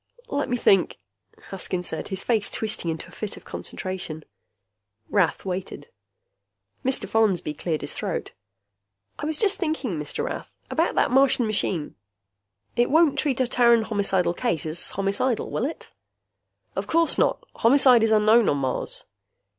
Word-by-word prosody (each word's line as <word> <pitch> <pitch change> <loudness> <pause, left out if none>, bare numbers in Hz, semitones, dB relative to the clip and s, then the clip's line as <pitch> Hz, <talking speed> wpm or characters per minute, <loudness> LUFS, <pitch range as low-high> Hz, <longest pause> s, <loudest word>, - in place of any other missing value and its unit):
"Let 285 0 -2
me 245 - 0
think!" 195 -5 +3 0.5
Haskins 185 -2 -3
said, 160 - -3
his 190 -1 -5
face 220 -4 +1
twisting 215 -6 0
into 160 +1 -5
a - - -17
fit 210 +3 -5
of - - -14
concentration. 185 -5 -5 0.9
Rath 200 -2 +1
waited. 190 - -5 0.9
Mr. 265 0 0
Follansby 200 -8 +1
cleared 155 +1 -3
his - - -1
throat. - - -4 0.9
"I 295 - -3
was 315 -1 0
just 405 +1 +1
thinking, 300 - -2
Mr. 150 - -3
Rath. - - -6
About - - 0
that - - +2
Martian 260 -2 +4
machine. 195 -7 -1 0.8
It 240 0 +2
won't 305 -2 +4
treat 275 -5 0
a 255 - +1
Terran 235 -2 +4
homicidal 195 -5 +1
case 165 -3 -1
as 155 +2 0
homicidal, 200 +5 -1
will 235 - -1
it?" 315 - -7 0.8
"Of - - -3
course 330 0 +2
not. - - +1
Homicide 250 0 +6
is 225 - +3
unknown 220 +1 +4
on 145 - +1
Mars." 130 -2 -1
215 Hz, 150 wpm, -24 LUFS, 180-255 Hz, 0.9 s, Homicide